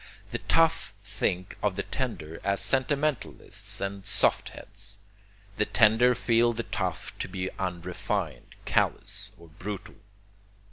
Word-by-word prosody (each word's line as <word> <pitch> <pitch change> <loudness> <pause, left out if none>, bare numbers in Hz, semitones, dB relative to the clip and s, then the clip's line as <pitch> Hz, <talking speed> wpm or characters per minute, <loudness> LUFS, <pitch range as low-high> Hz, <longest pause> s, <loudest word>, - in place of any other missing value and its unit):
The - - -1
tough 165 -10 +3
think 95 -2 -1
of 105 -3 +1
the 100 - -1
tender 90 - -4
as 100 0 +1
sentimentalists 140 0 0
and 100 0 -3
soft 100 -1 +2
heads. 100 -1 -9 0.6
The 105 - +3
tender 115 +3 +5
feel 120 0 +3
the 115 +1 -2
tough - - -3
to - - -2
be 90 0 -3
unrefined, 90 -1 -3
callous, - - 0
or 85 -1 -15
brutal. 100 +6 -7
100 Hz, 125 wpm, -28 LUFS, 95-120 Hz, 0.6 s, tender